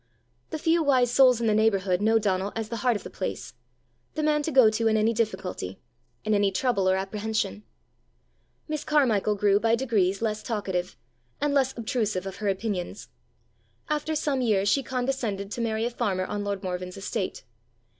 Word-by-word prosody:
The -, -, -3 dB
few 325 Hz, +2 st, +2 dB
wise 255 Hz, -5 st, +3 dB
souls 255 Hz, -2 st, +5 dB
in 235 Hz, -, -1 dB
the 215 Hz, -, +3 dB
neighbourhood 200 Hz, -4 st, +2 dB
know 220 Hz, +2 st, +4 dB
Donal 200 Hz, -2 st, 0 dB
as 225 Hz, -1 st, -3 dB
the 230 Hz, -, -3 dB
heart 245 Hz, +1 st, +2 dB
of 205 Hz, -, -4 dB
the -, -, -9 dB
place 185 Hz, -, -5 dB, 0.6 s
the 310 Hz, -, -1 dB
man 300 Hz, 0 st, +2 dB
to 295 Hz, -, -2 dB
go 260 Hz, -5 st, +7 dB
to 225 Hz, +1 st, 0 dB
in 220 Hz, 0 st, +3 dB
any 220 Hz, +2 st, +2 dB
difficulty, 190 Hz, -, -3 dB, 0.5 s
in 215 Hz, -, +1 dB
any 205 Hz, -1 st, +3 dB
trouble 195 Hz, -3 st, +1 dB
or 190 Hz, -, +3 dB
apprehension. 205 Hz, +1 st, -2 dB, 1.1 s
Miss 305 Hz, -1 st, -3 dB
Carmichael 225 Hz, -9 st, +2 dB
grew 200 Hz, 0 st, +3 dB
by 230 Hz, +1 st, +3 dB
degrees 205 Hz, -6 st, +1 dB
less 215 Hz, -1 st, -1 dB
talkative, 190 Hz, -5 st, -3 dB, 0.4 s
and 290 Hz, 0 st, 0 dB
less 265 Hz, -3 st, +1 dB
obtrusive 215 Hz, -5 st, -1 dB
of 190 Hz, -1 st, -6 dB
her 210 Hz, -, -3 dB
opinions. 195 Hz, -1 st, -3 dB, 0.8 s
After 300 Hz, +1 st, -1 dB
some 290 Hz, -3 st, 0 dB
years 205 Hz, -5 st, +2 dB
she 275 Hz, +7 st, +3 dB
condescended 245 Hz, -6 st, -2 dB
to 240 Hz, -, -3 dB
marry 225 Hz, -1 st, 0 dB
a 240 Hz, -, -1 dB
farmer 200 Hz, -6 st, -1 dB
on 205 Hz, +1 st, -3 dB
lord 200 Hz, -1 st, -3 dB
Morven's 180 Hz, 0 st, -4 dB
estate. 195 Hz, -1 st, -3 dB
220 Hz, 180 wpm, -26 LUFS, 195-245 Hz, 1.1 s, go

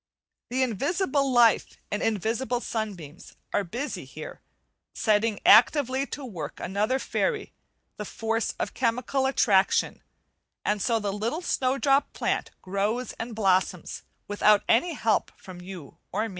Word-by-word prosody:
The 260 Hz, +2 st, +1 dB
invisible 275 Hz, -, 0 dB
life 240 Hz, -3 st, +4 dB
and 205 Hz, -, -1 dB
invisible 225 Hz, +4 st, -1 dB
sunbeams 195 Hz, -10 st, -6 dB, 0.2 s
are -, -, +2 dB
busy 240 Hz, -, -5 dB
here, -, -, -10 dB, 0.5 s
setting 215 Hz, -1 st, +1 dB
actively 260 Hz, +4 st, +5 dB
to 285 Hz, -, -6 dB
work 165 Hz, -, -7 dB
another 210 Hz, +7 st, 0 dB
fairy, 430 Hz, -, -2 dB, 0.4 s
the 210 Hz, -, -5 dB
force 225 Hz, +2 st, -2 dB
of -, -, -3 dB
"chemical 255 Hz, +3 st, 0 dB
attraction," 205 Hz, -7 st, +2 dB, 0.6 s
and 210 Hz, -1 st, 0 dB
so 230 Hz, +2 st, +2 dB
the 205 Hz, -3 st, -2 dB
little 230 Hz, -, -2 dB
snowdrop 275 Hz, 0 st, +1 dB
plant -, -, -1 dB
grows 205 Hz, +6 st, -2 dB
and 230 Hz, 0 st, -5 dB
blossoms, 185 Hz, -4 st, 0 dB, 0.3 s
without 205 Hz, 0 st, +4 dB
any 330 Hz, +9 st, +3 dB
help 225 Hz, -7 st, 0 dB
from 180 Hz, -2 st, -11 dB
you 180 Hz, -6 st, -10 dB
or 215 Hz, +4 st, -1 dB
me. -, -, -8 dB
225 Hz, 130 wpm, -26 LUFS, 205-260 Hz, 0.6 s, actively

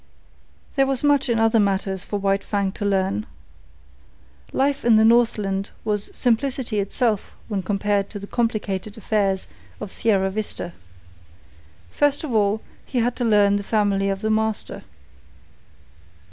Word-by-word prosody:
There 270 Hz, 0 st, +4 dB
was 270 Hz, -1 st, 0 dB
much 285 Hz, -3 st, +3 dB
in 230 Hz, -1 st, +2 dB
other 225 Hz, 0 st, +4 dB
matters 195 Hz, -2 st, 0 dB
for 205 Hz, -, -3 dB
White 195 Hz, 0 st, 0 dB
Fang 200 Hz, -2 st, -1 dB
to 205 Hz, -, -7 dB
learn. 190 Hz, -, 0 dB, 1.2 s
Life 275 Hz, +1 st, 0 dB
in 235 Hz, -2 st, +5 dB
the 220 Hz, 0 st, +5 dB
Northland 215 Hz, -4 st, +2 dB, 0.2 s
was 210 Hz, -1 st, 0 dB
simplicity 245 Hz, -2 st, 0 dB
itself 210 Hz, +1 st, -1 dB
when 205 Hz, -4 st, -2 dB
compared 200 Hz, +1 st, 0 dB
with 205 Hz, -, -7 dB
the 200 Hz, -, -7 dB
complicated 215 Hz, -3 st, -2 dB
affairs 200 Hz, -3 st, 0 dB, 0.3 s
of 210 Hz, -2 st, -6 dB
Sierra 195 Hz, -4 st, +1 dB
Vista. 200 Hz, -4 st, -5 dB, 1.2 s
First 290 Hz, +1 st, +1 dB
of 285 Hz, -6 st, -4 dB
all, 210 Hz, 0 st, +2 dB, 0.2 s
he 255 Hz, -, -5 dB
had 240 Hz, +1 st, +1 dB
to 245 Hz, -, -1 dB
learn 205 Hz, -3 st, +4 dB
the -, -, -2 dB
family 200 Hz, -2 st, +1 dB
of 195 Hz, 0 st, -2 dB
the 220 Hz, 0 st, 0 dB
master. 220 Hz, 0 st, -1 dB
210 Hz, 145 wpm, -23 LUFS, 195-230 Hz, 1.2 s, in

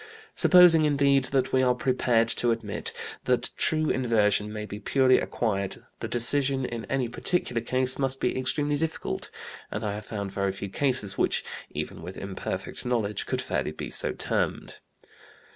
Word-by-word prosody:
Supposing, 175 Hz, -3 st, +7 dB
indeed, 140 Hz, -2 st, +3 dB
that 130 Hz, 0 st, 0 dB
we 130 Hz, -, +4 dB
are 125 Hz, -1 st, +3 dB
prepared 125 Hz, -2 st, +2 dB
to 120 Hz, -, +1 dB
admit 115 Hz, -3 st, -2 dB, 0.3 s
that 125 Hz, -1 st, +1 dB
true 155 Hz, -1 st, +1 dB
inversion 105 Hz, -4 st, +2 dB
may 105 Hz, 0 st, -5 dB
be 105 Hz, 0 st, -7 dB
purely 130 Hz, +4 st, +3 dB
acquired 100 Hz, -4 st, -2 dB
the -, -, -4 dB
decision 135 Hz, +2 st, 0 dB
in 115 Hz, -2 st, -5 dB
any 135 Hz, -2 st, -1 dB
particular 120 Hz, 0 st, 0 dB
case 130 Hz, +3 st, +1 dB
must 135 Hz, -1 st, +1 dB
be -, -, 0 dB
extremely 145 Hz, +3 st, +1 dB
difficult, 160 Hz, +1 st, -3 dB, 0.4 s
and 105 Hz, -, -4 dB
I 105 Hz, -1 st, -1 dB
have 105 Hz, +1 st, -7 dB
found 100 Hz, -3 st, -4 dB
very 100 Hz, -1 st, -1 dB
few 100 Hz, 0 st, -6 dB
cases 125 Hz, -4 st, 0 dB
which, -, -, +2 dB, 0.3 s
even -, -, -5 dB
with 90 Hz, +3 st, -8 dB
imperfect 100 Hz, -1 st, -4 dB
knowledge, 115 Hz, -5 st, -1 dB
could -, -, -1 dB
fairly 75 Hz, -, -2 dB, 0.2 s
so -, -, 0 dB
be -, -, -4 dB
termed. -, -, -1 dB
125 Hz, 160 wpm, -27 LUFS, 105-135 Hz, 0.4 s, Supposing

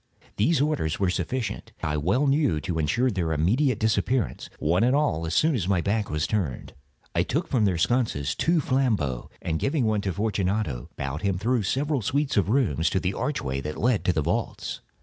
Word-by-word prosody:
These 145 Hz, +8 st, +3 dB
orders 145 Hz, -, 0 dB
were 95 Hz, -2 st, +2 dB
sufficient, 105 Hz, +5 st, -3 dB
I 75 Hz, -1 st, 0 dB
well 95 Hz, -, +1 dB
knew, 140 Hz, -, +2 dB
to 85 Hz, -2 st, -2 dB
insure 120 Hz, -, +1 dB
their 90 Hz, -5 st, -1 dB
immediate 110 Hz, -, +2 dB
disappearance, 110 Hz, +2 st, 0 dB
one 85 Hz, +6 st, +2 dB
and 125 Hz, +3 st, +3 dB
all, 140 Hz, -, +1 dB
as 80 Hz, -, -2 dB
soon 160 Hz, +1 st, +4 dB
as 100 Hz, -9 st, -1 dB
my 95 Hz, -2 st, +2 dB
back 100 Hz, +4 st, 0 dB
was 75 Hz, 0 st, 0 dB
turned. 90 Hz, -, -2 dB, 0.4 s
I -, -, +2 dB
took 160 Hz, +6 st, -1 dB
from 115 Hz, -6 st, +2 dB
their 95 Hz, -4 st, +1 dB
sconces 90 Hz, -, +1 dB
two 165 Hz, -, +2 dB
flambeaux, 110 Hz, -, 0 dB
and 80 Hz, -1 st, -1 dB
giving 135 Hz, -3 st, +1 dB
one 110 Hz, -2 st, +1 dB
to 100 Hz, -, -1 dB
Fortunato, 100 Hz, -, -1 dB
bowed 70 Hz, +2 st, -3 dB
him 100 Hz, -2 st, 0 dB
through 120 Hz, +5 st, +1 dB
several 140 Hz, +7 st, 0 dB
suites 140 Hz, +7 st, 0 dB
of 100 Hz, -1 st, +2 dB
rooms 95 Hz, -, +2 dB
to 95 Hz, -, 0 dB
the 90 Hz, +1 st, -1 dB
archway 70 Hz, -, -2 dB
that 75 Hz, +2 st, -5 dB
led 120 Hz, -3 st, +2 dB
into 90 Hz, -, +1 dB
the 80 Hz, -2 st, 0 dB
vaults. -, -, -2 dB
100 Hz, 195 wpm, -26 LUFS, 80-130 Hz, 0.4 s, soon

